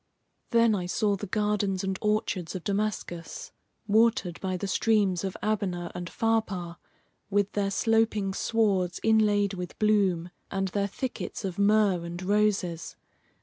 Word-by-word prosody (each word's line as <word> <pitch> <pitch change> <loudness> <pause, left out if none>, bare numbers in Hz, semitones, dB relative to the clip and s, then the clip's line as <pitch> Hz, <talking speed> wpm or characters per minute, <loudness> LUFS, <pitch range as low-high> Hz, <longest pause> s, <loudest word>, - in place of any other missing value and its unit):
Then 230 -1 +4
I 180 -3 -2
saw 205 +2 +1
the 205 +1 -6
gardens 205 -2 0
and 190 -1 -2
orchards 210 -5 -1
of 180 - -5
Damascus, 195 -5 -3 0.3
watered 215 -5 +2
by 185 -1 -1
the 190 - -4
streams 195 -2 +2
of 190 -1 -3
Abana 185 -5 -1
and 175 -1 -5
Pharpar, 195 -7 -1 0.5
with 205 0 +1
their 200 -1 0
sloping 215 -2 +1
swards 195 -6 +1
inlaid 210 -2 +3
with 180 -2 -6
bloom, 195 -5 +2 0.2
and 195 -1 -1
their 200 +1 0
thickets 245 0 -5
of 185 0 -4
myrrh 200 -3 +3
and 170 +1 -6
roses. 195 -4 0
200 Hz, 140 wpm, -28 LUFS, 180-215 Hz, 0.5 s, Then